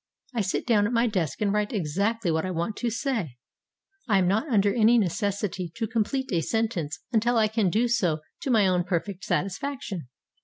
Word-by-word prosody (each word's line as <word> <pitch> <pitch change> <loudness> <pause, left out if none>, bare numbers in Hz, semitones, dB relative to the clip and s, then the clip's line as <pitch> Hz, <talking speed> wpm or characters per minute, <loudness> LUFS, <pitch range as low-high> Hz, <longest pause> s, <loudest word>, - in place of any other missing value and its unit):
I 235 - 0
sit 195 -1 -1
down 210 -4 +3
at 235 - -3
my 230 0 +3
desk 180 - -1
and 205 -1 +2
write 210 0 0
exactly 200 +2 0
what 160 0 0
I 185 - -2
want 175 +4 -2
to 240 - -1
say. 225 - -2 0.7
I 205 -4 +4
am 185 -2 +3
not 220 - +1
under 205 -6 +3
any 235 +1 +5
necessity 200 -3 -1
to 230 - -1
complete 230 +4 -1
a 170 -3 +2
sentence 185 -8 -2
until 235 +1 +2
I 220 -1 +4
can 215 -3 +1
do 225 +7 +2
so 175 -10 +1 0.2
to - - -3
my 220 -5 +4
own 180 -1 +2
perfect 180 +2 -3
satisfaction. 200 - -3
205 Hz, 195 wpm, -26 LUFS, 180-230 Hz, 0.7 s, any